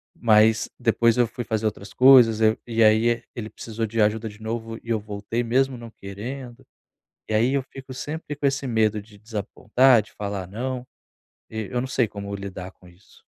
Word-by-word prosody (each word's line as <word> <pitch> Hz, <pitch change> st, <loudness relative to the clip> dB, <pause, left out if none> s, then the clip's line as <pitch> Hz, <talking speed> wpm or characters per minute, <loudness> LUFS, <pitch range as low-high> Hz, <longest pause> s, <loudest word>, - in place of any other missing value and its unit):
Mas 110 Hz, -1 st, +4 dB
depois 115 Hz, -1 st, +3 dB
eu 120 Hz, -2 st, +4 dB
fui 120 Hz, +1 st, -6 dB
fazer 110 Hz, 0 st, -2 dB
outras 100 Hz, 0 st, -6 dB
coisas 125 Hz, -4 st, +7 dB
aí 110 Hz, 0 st, +4 dB
e 115 Hz, -1 st, +2 dB
aí 115 Hz, +2 st, +4 dB
ele 110 Hz, -2 st, -5 dB
precisou 115 Hz, 0 st, -5 dB
de 110 Hz, +1 st, -1 dB
ajuda 110 Hz, +2 st, +1 dB
de 105 Hz, +1 st, -11 dB
novo 115 Hz, 0 st, -4 dB
e 115 Hz, -, -12 dB
eu 110 Hz, -2 st, +1 dB
voltei, 105 Hz, +3 st, -4 dB
mesmo 130 Hz, +2 st, +1 dB
não 115 Hz, -1 st, -10 dB
querendo. 120 Hz, +6 st, -8 dB, 0.6 s
E -, -, -1 dB
aí 120 Hz, +5 st, +3 dB
eu 140 Hz, -, +2 dB
fico 135 Hz, 0 st, -11 dB
sempre 150 Hz, +3 st, -5 dB
com 145 Hz, -1 st, 0 dB
esse 135 Hz, 0 st, -1 dB
medo 110 Hz, -2 st, +1 dB
de 105 Hz, 0 st, -18 dB
desapontar, 110 Hz, +3 st, +2 dB
de 105 Hz, -, -17 dB
falar 100 Hz, -3 st, -4 dB
não. 125 Hz, +5 st, -4 dB, 0.6 s
E 110 Hz, -3 st, -5 dB
eu 125 Hz, -, 0 dB
não 130 Hz, -, -2 dB
sei 125 Hz, -3 st, +1 dB
como 100 Hz, 0 st, -7 dB
lidar 95 Hz, -2 st, -7 dB
com 90 Hz, -, -20 dB
isso. 90 Hz, +3 st, -21 dB
115 Hz, 195 wpm, -24 LUFS, 105-125 Hz, 0.6 s, coisas